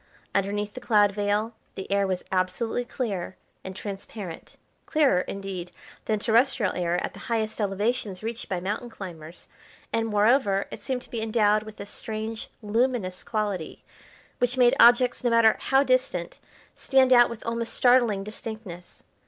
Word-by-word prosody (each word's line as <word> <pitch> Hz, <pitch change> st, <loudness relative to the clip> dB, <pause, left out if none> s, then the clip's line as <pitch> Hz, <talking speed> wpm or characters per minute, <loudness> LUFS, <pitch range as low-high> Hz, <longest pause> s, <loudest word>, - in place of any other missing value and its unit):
Underneath 205 Hz, +1 st, -1 dB
the 255 Hz, -, -8 dB
cloud 205 Hz, -3 st, +4 dB
veil 205 Hz, +3 st, -1 dB, 0.2 s
the 190 Hz, 0 st, -7 dB
air 200 Hz, 0 st, +2 dB
was 185 Hz, -1 st, -2 dB
absolutely 190 Hz, +6 st, -1 dB
clear 200 Hz, -8 st, -4 dB, 0.3 s
and 190 Hz, 0 st, -7 dB
transparent, 195 Hz, -3 st, -8 dB, 0.3 s
clearer, 285 Hz, -, +3 dB
indeed, 190 Hz, -2 st, -6 dB, 0.3 s
than 215 Hz, -, +1 dB
terrestrial 225 Hz, -1 st, +2 dB
air 175 Hz, -1 st, -1 dB
at -, -, -7 dB
the -, -, -11 dB
highest 220 Hz, -1 st, -1 dB
elevations 205 Hz, 0 st, -1 dB
reached 230 Hz, +1 st, -5 dB
by 185 Hz, -, -1 dB
mountain 205 Hz, +6 st, -3 dB
climbers, 175 Hz, -6 st, -10 dB, 0.5 s
and, 225 Hz, 0 st, +1 dB
moreover, 210 Hz, -1 st, +3 dB
it -, -, -7 dB
seemed 255 Hz, -2 st, -3 dB
to -, -, -14 dB
be 230 Hz, -, -3 dB
endowed 215 Hz, -1 st, +2 dB
with 215 Hz, 0 st, -11 dB
a 200 Hz, -, -5 dB
strange, 220 Hz, +1 st, -5 dB
luminous 215 Hz, -4 st, 0 dB
quality, 205 Hz, -7 st, -3 dB, 0.6 s
which 245 Hz, +1 st, 0 dB
made 245 Hz, -1 st, +5 dB
objects, 245 Hz, +1 st, +5 dB
no 245 Hz, -, +3 dB
matter 230 Hz, -1 st, +5 dB
how 270 Hz, +1 st, +3 dB
distant, 255 Hz, -10 st, 0 dB, 0.3 s
stand 265 Hz, -1 st, +3 dB
out 240 Hz, -1 st, +7 dB
with 235 Hz, -2 st, -8 dB
almost 230 Hz, 0 st, -2 dB
startling 240 Hz, -6 st, +4 dB
distinctness. 215 Hz, -4 st, -8 dB
215 Hz, 155 wpm, -26 LUFS, 195-235 Hz, 0.6 s, out